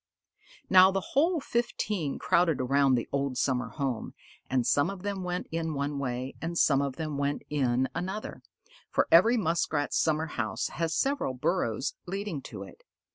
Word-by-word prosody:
Now 185 0 +8
the 195 -1 -3
whole 330 +5 +3
fifteen 210 - -2
crowded 170 -5 +2
around 135 +1 +3
the 120 - -2
old 140 -2 -1
summer 125 -1 0
home, 135 -6 -3 0.3
and 130 -2 +1
some 145 +5 +3
of 195 -2 -7
them 200 -2 -3
went 180 0 -3
in 165 -1 -2
one 140 0 -2
way, 130 0 -3
and 170 +1 -3
some 140 -4 +4
of 140 -2 -2
them 155 -1 -4
went 145 0 -1
in 130 -3 +1
another, 190 +4 -5 0.5
for - - +1
every 225 +9 +6
Muskrat's 160 -6 0
summer 160 0 +1
house 120 -8 -3
has 165 -1 -2
several 270 - 0
burrows 135 - -1
leading 195 -5 -4
to 105 -6 -8
it. 95 - -14
155 Hz, 165 wpm, -28 LUFS, 135-185 Hz, 0.5 s, Now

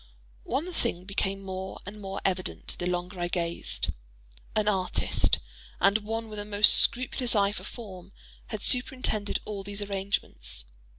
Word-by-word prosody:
One 350 +5 -1
thing 185 - -1
became 195 0 -1
more 190 0 -5
and 210 +2 -8
more 195 0 -4
evident 185 -1 -1
the 175 - -1
longer 180 +1 -2
I 175 - +1
gazed: 170 -1 -2 0.7
an 215 -1 +2
artist, 190 -3 +2 0.4
and 200 +2 +5
one 225 +2 -3
with 210 -1 -6
a - - -2
most 210 0 +7
scrupulous 245 0 +3
eye 200 -1 +4
for 210 - -6
form, 195 -5 -9 0.4
had 215 -2 -5
superintended 250 -5 +1
all 205 -2 -4
these 205 +1 -4
arrangements. 195 - -2
200 Hz, 145 wpm, -29 LUFS, 185-215 Hz, 0.7 s, most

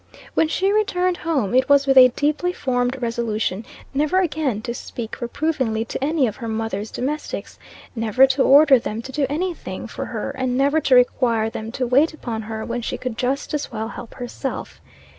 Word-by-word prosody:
When 320 - +3
she 380 +5 +1
returned 365 -4 +1
home, 280 -12 -1
it 260 +2 +3
was 280 -1 +5
with 270 -1 +3
a 255 -1 +10
deeply 300 +7 0
formed 250 -3 -1
resolution 225 -4 -1 0.3
never 300 +6 +2
again 300 - -1
to 235 - -3
speak 235 -1 -7
reprovingly 240 -3 -1
to 260 - -5
any 300 -1 +2
of 215 -3 -3
her 235 - -6
mother's 220 -2 -3
domestics 295 +4 -4 0.4
never 225 +3 +4
to 265 +1 0
order 280 -1 +7
them 225 0 -5
to 265 - -8
do 280 0 0
any 350 +5 -1
thing - - -7
for - - -6
her, - - -4
and 255 -1 -2
never 285 +4 +2
to 265 - +4
require 235 -3 +3
them 220 0 -6
to 255 - -1
wait 280 +6 +3
upon 230 -7 -4
her 220 0 -5
when 240 +1 -3
she - - -3
could 255 -3 -4
just 260 +5 -2
as 295 - -2
well 220 -1 -4
help 240 -1 -9
herself. 250 +2 -6
255 Hz, 195 wpm, -22 LUFS, 230-295 Hz, 0.4 s, a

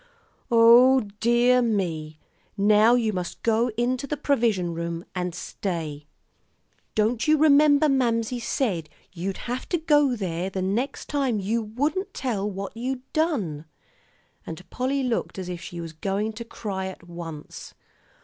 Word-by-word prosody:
"O 240 +3 +7 0.2
dear 240 +2 +4
me! 170 -9 -1 0.4
Now 210 +3 +5
you 225 -3 +1
must 180 -2 -5
go 230 +1 +2
into 255 +3 0
the 300 - -3
'provision 220 -12 +1
room' 170 +1 -4
and 180 -2 -3
stay. 155 -6 -5 0.9
Don't 220 +5 +1
you 310 0 +5
remember 295 0 +5
Mamsie 245 -3 +1
said 200 - -1 0.2
you'd 190 +2 -4
have 245 +1 -4
to 350 - +1
go 295 -5 +3
there 180 -3 -3
the 190 -1 -3
next 235 +9 -2
time 270 -7 0
you 220 +4 0
wouldn't 285 - -2
tell 210 -6 -2
what 195 +1 -6
you'd 250 +2 -3
done?" 210 - -1 0.8
And 165 +3 -9
Polly 270 +2 -1
looked 240 -5 -2
as 185 -1 -5
if 175 -1 -5
she 175 -1 -7
were 165 -1 -5
going 205 +3 -1
to 230 +2 -7
cry 195 -4 -4
at 180 -2 -10
once. 165 -3 -9
220 Hz, 145 wpm, -25 LUFS, 180-255 Hz, 0.9 s, O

